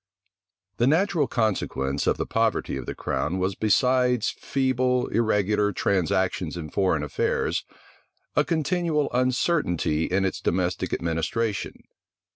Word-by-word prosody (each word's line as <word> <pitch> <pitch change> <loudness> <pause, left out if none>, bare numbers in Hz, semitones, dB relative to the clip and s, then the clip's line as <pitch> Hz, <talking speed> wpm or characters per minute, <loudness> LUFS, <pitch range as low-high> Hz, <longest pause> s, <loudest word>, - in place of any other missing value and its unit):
The 120 - +3
natural 165 -1 +2
consequence 90 - -1
of - - +2
the - - -2
poverty - - 0
of - - -6
the - - -4
crown 90 +5 -2
was 95 +1 0
besides 125 +3 +2
feeble, 130 -2 0
irregular 105 -2 +1
transactions 90 -2 0
in 75 -3 -6
foreign 90 -7 +1
affairs, 75 - -1 0.7
a - - +4
continual 160 -2 0
uncertainty 125 - +1
in 95 +1 +1
its 95 - -2
domestic 90 0 -1
administration. 90 +6 -2
105 Hz, 115 wpm, -25 LUFS, 90-130 Hz, 0.7 s, a